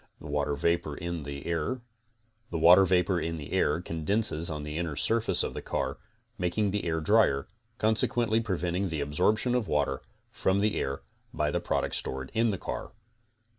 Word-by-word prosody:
The - - -13
water 75 0 -1
vapor 85 0 0
in 85 -1 -4
the 70 -1 -6
CONSTRUCTIVE 85 +10 -2 0.7
BEEKEEPING 90 +2 +6
29 85 -5 -2
air - - +1
condenses 85 +1 +1
on 75 -2 -4
the 75 0 -5
inner 85 -4 -2
surface 115 +8 +2
of - - -3
the - - -5
car, - - -3 0.4
making 95 +3 0
the 105 -1 -2
air 80 -1 0
drier, 100 -7 +3 0.3
consequently 110 +1 +2
preventing 95 -3 -1
the 80 -4 -2
absorbtion 105 - +1
of 125 -4 0
water 70 -2 0 0.3
from 95 +1 +1
the 105 0 +1
air 70 +1 -3 0.3
by - - 0
the - - 0
products - - -1
stored 65 0 -3
in 115 +1 +2
the 100 -4 0
car. - - -6
85 Hz, 165 wpm, -29 LUFS, 75-105 Hz, 0.7 s, BEEKEEPING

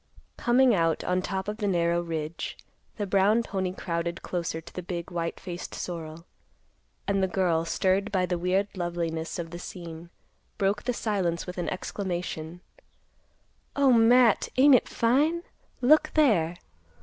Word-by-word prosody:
Coming 245 +1 +4
out 165 -4 +1
on 180 0 0
top 190 +1 -3
of 210 0 -3
the 210 - -1
narrow 170 -2 +2
ridge, 160 -1 -4 0.4
the 205 - -1
brown 200 +4 +3
pony 190 -4 -2
crowded 170 -2 -3
closer 170 -2 -3
to 165 - -13
the 180 - -5
big, 175 0 -5
white 170 -1 -3
faced 175 -2 -7
sorrel, 165 -1 -6 0.8
and 195 -1 +1
the 190 - +2
girl, 175 -3 +1
stirred 190 +4 +1
by 185 -3 +2
the 180 -1 -2
weird 185 +3 +1
loveliness 170 -2 -3
of 165 -2 -5
the 175 - -7
scene, 170 -2 -8 0.5
broke 200 +1 0
the 250 - 0
silence 190 -7 -1
with 180 0 -6
an 175 - -1
exclamation, 175 -3 -4 1.1
"O 275 -2 +4
Matt! 235 0 +5
Ain't 280 +2 +7
it 250 - +4
fine? 295 +9 +2 0.4
Look 310 +4 +5
there!" 195 - +3
180 Hz, 150 wpm, -27 LUFS, 170-210 Hz, 1.1 s, Ain't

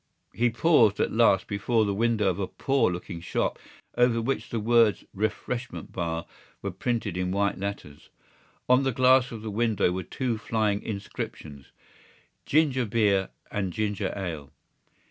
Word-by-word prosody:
He 120 +1 +2
paused 115 - +4
at - - +1
last 110 -4 +4
before 110 +2 +1
the 100 - 0
window 110 0 +1
of 95 0 0
a 95 - -1
poor 135 -8 +1
looking 90 -1 -6
shop 85 - -1 0.4
over 120 -1 +3
which 130 +4 -2
the 115 - -2
words 115 -1 +3
Refreshment 110 +4 -3
Bar 85 -2 -3 0.4
were 100 - -2
printed 105 0 -2
in 90 0 -1
white 100 +1 0
letters. 100 -7 -6 0.6
On 125 +1 +5
the 135 -1 +1
glass 130 0 +4
of 110 -2 -7
the 110 - -4
window 110 -4 +1
were 95 +1 -2
two 120 +3 -3
flying 105 -2 0
inscriptions: 75 - -6 0.8
Ginger 140 -5 +2
Beer 100 -3 +2 0.2
and 95 -3 -2
Ginger 105 +1 -2
Ale. 80 -8 -5
105 Hz, 150 wpm, -27 LUFS, 95-120 Hz, 0.8 s, On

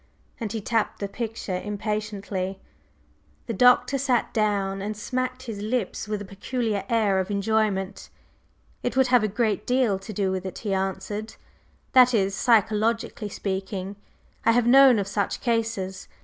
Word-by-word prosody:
and 225 -4 -3
he 225 - -2
tapped 225 +1 -1
the 200 - -3
picture 210 -4 -4
impatiently. 205 -2 -3 0.9
The 230 - -3
Doctor 250 +5 +4
sat 255 -3 +1
down 200 -3 0
and 210 +1 -4
smacked 255 +3 -3
his 220 -5 -6
lips 220 -1 -2
with 210 -1 -2
a - - -10
peculiar 205 +1 -2
air 210 -4 +2
of 190 +1 -2
enjoyment. 205 -1 -1 0.7
"It 245 +1 -2
would 260 -1 +4
have 250 -3 +5
a - - +2
great 210 0 -1
deal 245 -6 +2
to 195 +3 -8
do 195 -2 0
with 190 -1 -2
it," 190 - -6
he 205 -3 -3
answered, 195 +3 -3 0.6
"that 250 -1 +7
is, 195 -2 +1
psychologically 220 0 +1
speaking. 190 0 -4 0.5
I 230 - +4
have 245 0 +3
known 260 0 +7
of 200 -1 -1
such 200 0 -1
cases. 225 -5 -2
210 Hz, 155 wpm, -25 LUFS, 195-235 Hz, 0.9 s, that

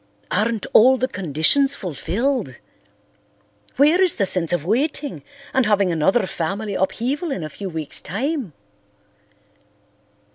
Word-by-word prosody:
Aren't 220 +2 0
all 260 +4 +6
the 255 - 0
conditions 190 - +1
fulfilled? 195 - -2 1.2
Where 305 +7 +4
is 370 -2 +3
the 200 - +1
sense 180 -3 +1
of 175 -3 -1
waiting 280 - -1 0.3
and 260 -4 +2
having 200 -3 +2
another 190 +7 +2
family 195 +5 -3
upheaval 250 - -1
in 185 - -3
a 155 - -5
few 195 +6 -7
weeks' 160 -4 -4
time?" 250 - -3
210 Hz, 120 wpm, -21 LUFS, 175-265 Hz, 1.2 s, all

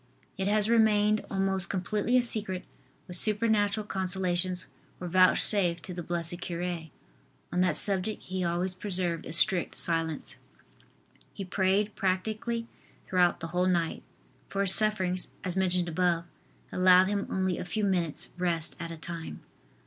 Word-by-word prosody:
It 190 - -3
has 210 0 +4
remained 215 -2 +3
almost 190 -2 +1
completely 205 +5 0
a 250 - +3
secret 210 -6 -2 0.4
what 180 - -4
supernatural 210 0 +1
consolations 185 -2 0 0.3
were 180 - -6
vouchsafed 185 -1 +4
to 180 - -7
the 175 - -6
blessed 170 +1 -4
cure. 175 -1 -4 0.7
On 180 - +1
that 180 -4 +1
subject 200 +3 +2
he 185 0 -4
always 175 +2 -1
preserved 180 -3 -2
a - - -7
strict 175 +2 +5
silence. 165 -3 -3 1.0
He 195 - -7
prayed 195 +3 0
practically 215 +5 -2 0.4
throughout 180 -2 +1
the 165 - -4
whole 180 +1 +1
night, 170 -3 -1 0.5
for 195 - -2
his 195 -1 +6
sufferings, 185 -4 +3 0.2
as 185 -2 -3
mentioned 180 -2 0
above, 170 0 0 0.5
allowed 185 0 +5
him 200 +1 -2
only 190 -1 -1
a - - -4
few 210 +4 -3
minutes 180 -6 -1
rest 170 -3 -1
at 170 -1 -6
a 165 - -8
time. 165 0 -8
185 Hz, 145 wpm, -28 LUFS, 175-200 Hz, 1.0 s, his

